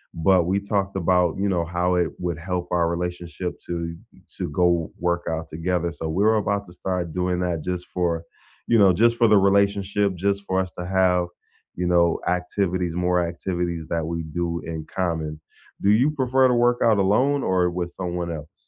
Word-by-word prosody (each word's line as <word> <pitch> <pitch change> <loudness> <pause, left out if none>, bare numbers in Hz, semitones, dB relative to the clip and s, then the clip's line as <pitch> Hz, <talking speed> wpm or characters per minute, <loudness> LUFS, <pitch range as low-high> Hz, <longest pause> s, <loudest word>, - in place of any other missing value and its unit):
but 90 +2 +4
we 95 +3 +1
talked 100 -1 -2
about, 90 -2 +2
you 100 0 +1
know, 85 -3 0
how 90 +1 0
it 90 -2 +1
would 85 -3 -2
help 90 0 -3
our 85 -1 +2
relationship 90 +1 -4
to 85 -1 -3 0.4
to - - -2
go 85 0 +1
work 85 0 0
out 80 0 -3
together, 85 +2 -1
so 80 -1 -5
we're 105 +7 +3
about 100 -1 0
to 90 - -14
start 90 -2 -3
doing 90 0 0
that 85 -3 -1
just 90 +1 -4
for 85 -2 -1 0.4
you 115 - +3
know, 95 -3 +6
just 115 +5 +3
for 115 - +4
the 105 - +5
relationship, 100 0 +2
just 100 +3 0
for 95 - 0
us 95 -2 0
to 90 - -7
have, 90 -1 +2 0.5
you 90 - -2
know, 85 -1 +3
activities 90 -1 -1
more 90 0 +1
activities 85 -1 -3
that 85 -1 -1
we 85 +1 -3
do 85 +2 -3
in 80 -1 -5
common, 80 -4 -3 0.4
do 100 - +4
you 125 +8 +4
prefer 130 -2 +3
to 125 - +2
work 120 0 +3
out 115 -2 +4
alone 125 +9 +2
or 90 -1 +2
with 85 0 -3
someone 90 -1 -4
else? 75 -1 -7
90 Hz, 190 wpm, -23 LUFS, 85-100 Hz, 0.5 s, know